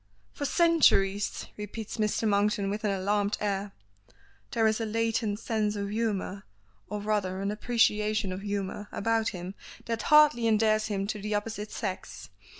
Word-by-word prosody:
"For 285 - -4
centuries!" 265 - +3
repeats 210 +2 -6
Mr. 215 +1 0
Monkton 205 0 +1
with 210 +2 -4
an 210 - +1
alarmed 200 +1 0
air. 200 -1 -2 0.8
There 225 -2 +1
is 220 +1 +2
a - - 0
latent 225 -1 0
sense 215 -2 -1
of 200 0 -3
humor 210 -3 -2 0.5
(or 210 +1 -3
rather 200 -3 -1
an 200 +1 -1
appreciation 215 -2 +1
of 185 +1 -5
humor) 205 0 -3
about 225 +1 +1
him 180 -1 -6 0.3
that 230 -1 -2
hardly 300 -6 +6
endears 215 0 +3
him 200 -2 -1
to 210 0 -4
the 210 +1 -2
opposite 210 0 -3
sex. 185 - -5
210 Hz, 150 wpm, -28 LUFS, 200-225 Hz, 0.8 s, hardly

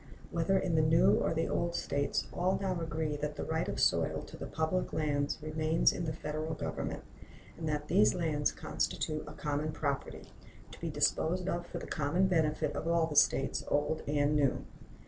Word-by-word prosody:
Whether 170 +3 +2
in 185 -2 0
the 160 - +4
new 155 +1 +5
or - - +1
the 165 0 0
old 170 0 -1
States, 140 -4 -1
all 185 +2 +1
now 185 -3 -1
agree 155 -2 -2
that 150 0 -3
the - - -4
right - - -1
of - - -3
soil - - +2
to - - -11
the - - -6
public 160 +4 -1
lands 145 -2 0
remains 155 +1 +2
in 175 - -3
the 160 - -1
Federal 155 0 -4
Government, - - -4 0.5
and 160 -2 -4
that 150 0 -2
these 195 +5 +4
lands 155 -4 +1
constitute 155 -1 -2
a 150 - -8
common 150 +1 -2
property, 145 -3 -3 0.4
to - - -12
be 165 - -2
disposed 160 +4 +1
of 175 -2 -2
for - - -6
the - - -6
common 155 +6 +1
benefit 160 -5 +1
of 160 - -3
all 170 -1 +3
the 155 -2 -5
States, 135 -1 +3
old 145 +2 0
and 145 0 +2
new. 145 -3 +1
155 Hz, 190 wpm, -32 LUFS, 150-170 Hz, 0.5 s, new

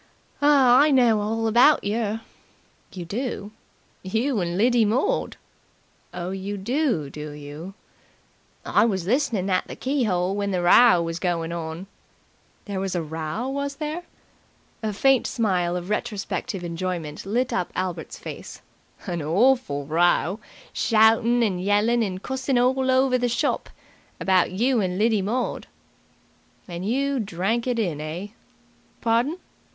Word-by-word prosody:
"I 280 -1 +6
know 240 -6 +4
all 225 +2 -1
about 245 +7 +5
yer." 220 +1 -1 0.7
"You 180 -2 -7
do?" 210 +1 -4 0.5
"You 225 +6 -1
and 175 -1 -2
Lidy 240 +2 +4
Mord." 265 - 0 0.7
"Oh, 175 +1 -5
you 195 +2 -4
do, 235 - 0
do 150 +1 -7
you?" 150 +6 -9 0.9
"I - - +3
was 190 -6 0
listening 230 -4 0
at 185 - +1
the - - -7
key 260 -4 -1
'ole 180 +1 0
while 205 0 -1
the 180 -2 -1
row 180 0 +6
was 165 +1 -4
goin' 170 -2 -1
on." 165 +1 -5 0.8
"There 200 -2 -4
was 190 -1 -2
a 170 - -1
row, 160 +8 -4
was 280 +1 -3
there?" 305 +3 -4 0.8
A 220 -1 -1
faint 265 +5 +3
smile 180 -6 0
of 180 +3 -6
retrospective 210 -1 -3
enjoyment 170 -3 -4
lit 240 +6 -1
up 175 - -1
Albert's 180 -3 -4
face. - - -9 0.4
"An 175 -4 -3
orful 165 - +2
row! 175 +5 +2 0.3
Shoutin' 225 +2 +3
and 190 -5 0
yellin' 210 +4 +2
and 190 -3 -3
cussin' 265 0 -1
all 260 +2 +2
over 260 0 +3
the 245 0 0
shop. 235 - -1 0.5
About 185 -2 +3
you 235 +5 +1
and 180 -1 -2
Lidy 215 0 +2
Maud." 235 +6 -2 1.0
"And 175 0 -6
you 275 +2 0
drank 215 +4 -1
it 245 -2 0
in, 175 -10 -1
eh?" 165 +6 -5 0.7
"Pardon?" 240 +8 +1
210 Hz, 140 wpm, -24 LUFS, 180-245 Hz, 1.0 s, I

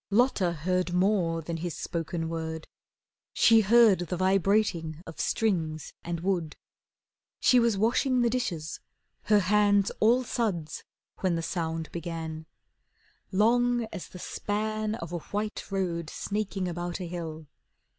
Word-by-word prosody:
Lotta 205 -4 +3
heard 180 +2 -1
more 180 -4 +2
than 165 +1 -4
his 170 0 -4
spoken 165 0 -3
word. 160 -1 -4 0.7
She 225 -1 +6
heard 220 -2 +6
the 175 0 -3
vibrating 185 -4 +1
of 160 -2 -10
strings 160 -8 -1
and 170 -1 -3
wood. 175 -4 -1 0.8
She 250 - +5
was 230 -3 +2
washing 250 +4 +2
the 240 - +3
dishes, 175 -11 -2 0.5
her 210 -1 +4
hands 205 +1 +3
all 240 +4 +4
suds, 200 -11 -2 0.4
When 185 -3 +1
the 165 - -2
sound 165 -1 -3
began, 160 -2 -5 0.8
Long 240 +4 +3
as 190 - -6
the - - -11
span 215 +3 -2
Of 170 -6 -7
a 175 - -2
white 210 +5 -4
road 175 -5 -2
snaking 200 -1 -3
about 175 +1 -4
a 180 - -4
hill. 165 -2 -6
185 Hz, 135 wpm, -28 LUFS, 165-215 Hz, 0.8 s, She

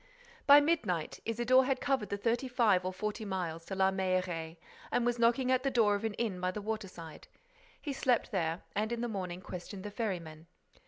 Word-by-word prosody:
By 285 +1 +10
midnight, 285 - 0
Isidore 240 +3 +3
had 265 -1 0
covered 270 -8 0
the 200 - -2
thirty 235 +5 0
five 225 -7 +3
or 185 - -1
forty 210 +4 -4
miles 175 -5 -3
to 190 - -5
La 190 0 +3
Mailleraie 185 -3 -1 0.3
and 240 - +1
was 240 0 0
knocking 240 +2 +3
at 255 0 +3
the 275 - +1
door 230 -5 +3
of 205 +1 -2
an 220 -2 -2
inn 205 -6 -2
by 180 - +1
the 185 - -4
waterside. 195 -7 -6 0.5
He 290 - -4
slept 255 -3 +1
there 165 -3 -1
and, 215 +3 0
in 235 -1 -2
the 240 - -1
morning, 185 -5 -4
questioned 185 +2 -7
the 210 - -6
ferrymen. 170 -8 -4
205 Hz, 200 wpm, -32 LUFS, 185-240 Hz, 0.5 s, By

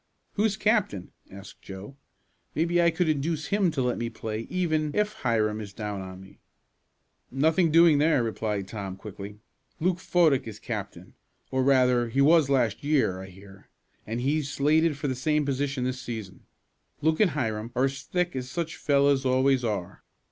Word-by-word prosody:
"Who's 210 -1 +1
captain?" 205 - 0 0.2
asked 95 +1 -12
Joe. 100 +7 -9 0.6
"Maybe 170 +2 +2
I 170 - +5
could 175 +1 0
induce 155 0 -1
him 200 -3 +2
to 145 -5 -1
let 125 0 -1
me 120 - -2
play 110 -1 -5
even 155 -4 0
if 210 0 +1
Hiram 110 - 0
is 100 -2 -8
down 105 -2 -4
on 95 0 -8
me." 95 0 -15 0.9
"Nothing 160 +6 +2
doing 165 -2 +6
there," 150 -4 +3
replied 105 -3 -2
Tom 100 -2 -6
quickly. 100 +1 -9 0.4
"Luke 175 +1 +1
Fodick 155 -9 +2
is 110 -2 -7
captain, 100 -6 -6 0.4
or, 130 0 +1
rather 125 -3 +3
he 130 - -1
was 150 0 +5
last 125 -5 +1
year, 135 -11 +1
I 95 - -8
hear, 95 +1 -15 0.4
and 115 +3 -3
he's 145 +2 0
slated 155 +2 +2
for 145 - -3
the 130 - 0
same 150 +3 0
position 140 -1 -1
this 130 0 -2
season. 110 -7 -7 0.5
Luke 155 +1 +2
and 210 - +5
Hiram 110 -3 -2
are 130 +2 +3
as 135 0 -3
thick 180 +5 -2
as 125 -1 -4
such 165 +3 -4
fellows 140 -1 +2
always 130 0 +2
are. 105 -6 -4
130 Hz, 170 wpm, -27 LUFS, 110-155 Hz, 0.9 s, doing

